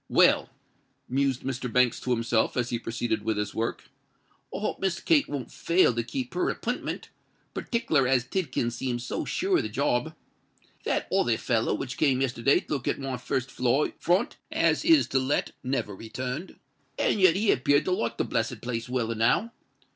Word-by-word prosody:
"Well," - - +4 0.6
mused 135 0 0
Mr. 130 -2 -3
Banks 125 0 +3
to - - -6
himself, 115 -1 +1
as 125 -1 0
he 120 - -1
proceeded 115 -1 -2
with 110 0 -1
his 105 -1 -2
work, 115 +1 -2 0.7
"I - - -4
hope 210 - -2
Miss 190 -3 0
Kate 310 -4 +3
won't 140 -4 -5
fail 170 -6 +3
to 115 - 0
keep 125 +2 -5
her 180 - +1
appintment—partickler 230 - -3
as 130 -2 +3
Tidkins 130 -7 -1
seems 120 -1 -3
so - - -3
sure 375 0 +1
of - - +2
the - - -4
job. - - 0 0.7
That - - 0
other 120 -12 +2
feller 115 -4 0
which 130 +6 -5
came 135 -4 +3
yesterday 130 0 +2
to - - -5
look 135 -4 -3
at - - +1
my 135 -2 -4
first 130 +2 -2
floor 125 +4 +1
front 185 - +1
as - - +2
is 325 -3 +5
to 135 - +2
let, 130 +3 0
never 125 -6 -2
returned. 125 - -5 0.4
And 205 - +1
yet 185 -3 +6
he 205 +2 +3
appeared 145 +3 +3
to - - 0
like 115 -11 -1
the - - +1
blessed 115 0 -2
place 120 -1 -3
well 125 -3 -1
enow. 115 - +2
130 Hz, 180 wpm, -27 LUFS, 120-160 Hz, 0.7 s, yet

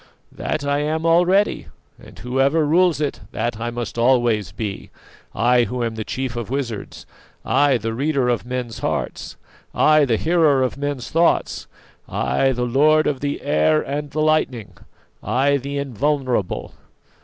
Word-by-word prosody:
"That 145 - -3
I 145 0 +1
am 155 +2 -1
already, 180 +5 +3 0.3
and - - -15
whoever 135 +6 +1
rules 170 +1 +3
it, 145 -5 -2
that 115 0 -2
I 120 +1 -2
must 120 -1 -5
always 120 -6 +2
be. 100 0 -5 0.5
I, 120 +1 +3
who 125 +3 -3
am 115 -1 -2
the 110 0 -4
chief 130 +1 -4
of 120 -3 -5
wizards; 125 -5 -5 0.4
I, 140 -3 +3
the 115 -1 -4
reader 135 +1 0
of 120 -1 0
men's 125 -2 -5
hearts; - - -4 0.4
I, 155 -1 +5
the 115 -4 +1
hearer 160 -4 +3
of 130 - -1
men's 140 -2 -4
thoughts! 165 +1 +1 0.4
I, 135 - +1
the 125 -1 -1
lord 150 +5 +3
of 140 -3 -1
the 145 +1 -3
air 75 0 +2
and 145 +1 -4
the 155 +2 -2
lightning; 155 -8 0 0.5
I, 135 +6 +1
the 140 +1 -5
invulnerable. 135 -5 -1
135 Hz, 155 wpm, -21 LUFS, 120-150 Hz, 0.5 s, I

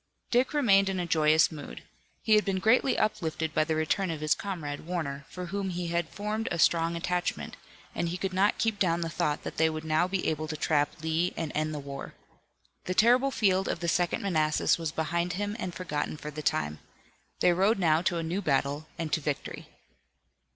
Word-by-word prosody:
Dick 250 +1 +3
remained 195 -9 +4
in 190 -1 -2
a 175 - -1
joyous 155 -1 +4
mood. 145 - -9 0.4
He 220 - +3
had 210 0 +5
been 195 -2 -1
greatly 235 +7 +3
uplifted 160 -6 -1
by - - +3
the 160 0 -1
return 165 +5 0
of 160 -2 -3
his 155 0 +2
comrade, 160 -8 -5
Warner, 140 -6 -3
for 180 0 -6
whom 195 +2 -3
he 175 -1 -3
had 170 -1 -1
formed 210 +2 -3
a 175 - -2
strong 165 0 +3
attachment, 180 +1 -2 0.4
and 170 - -1
he 175 - -3
could 190 0 -3
not 195 +3 +2
keep 220 -3 0
down 170 -2 +2
the 165 - -2
thought 165 -3 -1
that - - -6
they 160 0 +4
would 155 0 -5
now 160 +3 +2
be 185 0 -2
able 155 0 -1
to 155 0 -4
trap 150 0 0
Lee 160 +3 0
and 165 -2 -3
end 155 0 -1
the 150 - -4
war. 140 -1 -7 0.7
The 185 - -2
terrible 250 +6 +5
field 195 -7 +2
of - - -2
the 170 - -3
Second 175 +2 +1
Manassas 155 -4 +2
was 165 -2 -2
behind 170 +3 -1
him 205 +2 -2
and 180 - -3
forgotten 155 -4 -3
for 150 0 -7
the 155 +1 -6
time. 75 - -1 0.6
They 180 - +4
rode 195 +6 +3
now 165 -4 +3
to 175 -1 0
a 165 - -2
new 175 +5 -2
battle 145 0 0
and 165 -3 -4
to 160 - +2
victory. 145 -1 -4
170 Hz, 210 wpm, -28 LUFS, 155-190 Hz, 0.7 s, had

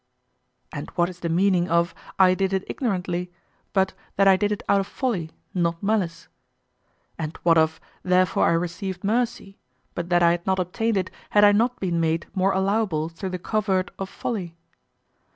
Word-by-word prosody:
And - - -6
what 175 0 +2
is 180 -1 -11
the 170 - -3
meaning 180 +1 +2
of 170 +1 +2 0.2
"I 185 -1 +6
did 195 +1 0
it 190 0 0
ignorantly" 180 -6 -2 0.4
but 190 -1 +1 0.2
that 195 0 +4
I 190 - +7
did 205 +2 0
it 210 - -3
out 200 0 +4
of 195 - -2
folly, 205 - -2 0.2
not 170 -1 -1
malice? 195 -5 -1 0.9
And 160 0 -4
what 170 -1 +5
of 160 0 +2 0.2
"Therefore 185 0 +3
I - - +3
received 180 +3 -3
mercy" 210 -2 -1 0.3
but 175 0 -4
that 175 -1 +3
I 170 - +6
had 175 +1 -3
not 190 0 +2
obtained 205 +5 0
it 185 -1 -1 0.2
had 205 - +4
I 205 - +8
not 240 +4 +1
been 175 -3 -1
made 165 0 0
more 190 0 +2
allowable 190 -5 0
through 170 +3 -6
the 185 - -3
covert 195 -1 0
of 195 0 -4
folly? 185 -9 -4
185 Hz, 180 wpm, -24 LUFS, 170-200 Hz, 0.9 s, I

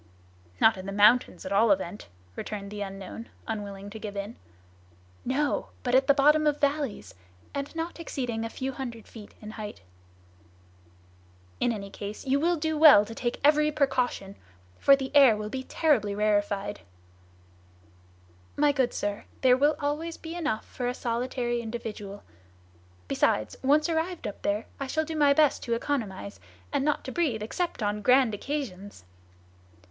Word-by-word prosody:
"Not 220 - +5
in 185 +1 -7
the - - -3
mountains, 210 +5 +4
at - - -5
all 215 +3 +4
events," 190 0 0 0.3
returned 200 -2 -6
the 210 0 -6
unknown, 195 +3 -7 0.2
unwilling 205 -2 -5
to 220 - -8
give 205 -1 -6
in. 200 +3 -5 0.9
"No! 280 +3 0 0.2
but 245 - -1
at 265 +1 +4
the 280 - +7
bottom 300 +2 +4
of 295 - +3
the - - -21
valleys, 280 - -5 0.4
and 280 +2 -4
not 330 +1 -4
exceeding 245 -8 -3
a 230 - -3
few 265 +3 -4
hundred 240 -4 -7
feet 215 -3 -12
in 215 - -7
height." 215 - -8 1.8
"In 245 - +2
any 200 -3 -6
case 205 +5 -7
you 270 +1 +2
will 345 +3 +2
do 315 -1 -2
well 285 -10 +9
to 225 - -8
take 240 +1 -3
every 300 +1 +4
precaution, 250 -9 0 0.4
for 275 - +7
the 270 +1 -6
air 265 -7 +7
will 210 0 -4
be 260 - -3
terribly 230 -11 +1
rarified." 205 -1 0 1.8
"My 295 0 +4
good 265 -3 0
sir, 205 0 -3 0.2
there 255 -1 +6
will 290 +3 +3
always 310 +3 -2
be 325 0 -8
enough 295 -11 -2
for 245 - -4
a 250 - -2
solitary 240 0 -2
individual; 220 -3 -6 0.8
besides, 110 - +1
once 295 +4 +3
arrived 335 +1 -2
up 205 - -6
there, 205 +2 -1
I 275 - -3
shall 315 +4 0
do 320 0 -5
my 290 -2 +5
best 300 -2 +3
to 235 - 0
economize, 195 - -3 0.3
and - - +1
not 300 0 0
to 260 - -6
breathe 260 -11 0
except 295 +2 -3
on 210 0 -1
grand 250 +1 +4
occasions!" 205 - -5
245 Hz, 165 wpm, -27 LUFS, 210-290 Hz, 1.8 s, well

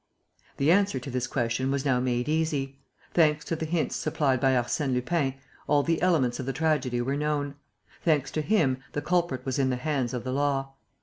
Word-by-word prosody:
The 140 +3 +3
answer 200 -3 +3
to 130 +2 -7
this 125 0 -1
question 120 +1 -1
was 140 0 -1
now 130 -3 +3
made 125 0 0
easy. 150 -4 -1 0.3
Thanks 150 -3 +3
to 165 - -1
the 160 0 -4
hints 165 0 0
supplied 135 -4 +1
by 135 -1 +4
Arsène 130 +3 0
Lupin, 135 +1 0 0.3
all 145 -1 +3
the 165 +1 0
elements 145 -10 +2
of 130 - -4
the 135 - -1
tragedy 135 -5 0
were 135 +3 -1
known. 145 -1 -1 0.5
Thanks 150 -5 +2
to 155 - -1
him, 150 -8 +2
the 145 - -2
culprit 175 -8 0
was 130 0 -1
in 135 -1 +2
the 130 - 0
hands 130 -2 -1
of 120 - -4
the 130 - -3
law. 135 -1 0
140 Hz, 200 wpm, -27 LUFS, 130-155 Hz, 0.5 s, by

